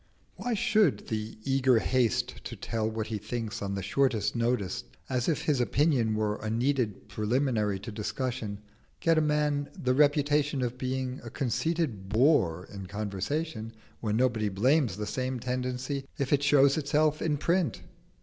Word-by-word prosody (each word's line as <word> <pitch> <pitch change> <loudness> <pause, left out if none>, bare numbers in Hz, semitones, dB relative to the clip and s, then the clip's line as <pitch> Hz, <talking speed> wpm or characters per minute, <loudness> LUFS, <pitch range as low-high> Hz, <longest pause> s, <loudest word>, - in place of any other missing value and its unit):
Why 245 -2 -2
should 210 -5 +2
the 110 0 -3
eager 135 -2 +3
haste 120 0 0
to - - -5
tell 110 -1 -2
what 110 -1 -3
he 110 -1 -3
thinks 110 +1 -4
on 100 -1 -2
the 95 - -3
shortest 115 +1 +1
notice, 120 0 0 0.2
as 125 +1 0
if 155 - 0
his 145 -5 +2
opinion 125 -4 +2
were 105 -1 0
a 110 - -4
needed 120 -2 0
preliminary 105 0 0
to 115 - -6
discussion, 110 -1 -3 0.4
get 165 -1 +3
a - - +2
man 150 -1 +1
the 125 0 +1
reputation 145 0 +3
of 125 +1 -3
being 130 0 -2
a 115 - -7
conceited 130 - -1
bore 105 - +3
in 95 -2 -7
conversation, 110 - -3 0.2
when 110 -1 -1
nobody 115 -4 +2
blames 120 - +2
the 105 - -3
same 130 +3 -2
tendency 130 +2 -3
if 140 +1 0
it 140 - +3
shows 140 0 +5
itself 150 +1 +1
in 150 -3 +1
print? 170 - 0
125 Hz, 160 wpm, -29 LUFS, 110-145 Hz, 0.4 s, shows